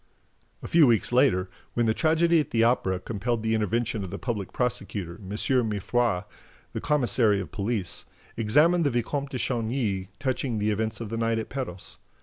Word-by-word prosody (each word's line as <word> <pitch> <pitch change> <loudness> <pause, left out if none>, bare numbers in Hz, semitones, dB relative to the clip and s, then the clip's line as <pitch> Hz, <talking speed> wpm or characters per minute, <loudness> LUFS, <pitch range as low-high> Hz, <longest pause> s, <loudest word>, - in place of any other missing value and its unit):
A - - -5
few 165 -4 +5
weeks 115 0 +3
later, 120 -8 +3 0.3
when 120 - +2
the 110 - +2
tragedy 165 +4 +3
at 150 - -1
the 115 -1 +2
Opera 95 -6 +2
compelled 115 +3 -2
the 110 0 +1
intervention 110 0 0
of 95 - -5
the - - -5
public 105 -7 -4
prosecutor, 100 -7 -3
M. 95 - -10
Mifroid, 110 -2 0 0.5
the - - -3
commissary 120 -7 +3
of 95 - -6
police, 100 -2 -2 0.3
examined 150 +11 +3
the 145 - +3
Vicomte 135 +3 -2
de 130 - -4
Chagny 115 -6 -1
touching 130 -3 -1
the 105 +1 +1
events 110 +2 -2
of 110 - -5
the 115 - -3
night 115 0 +1
at 110 - -4
Perros. 125 -10 -6
115 Hz, 175 wpm, -26 LUFS, 105-130 Hz, 0.5 s, few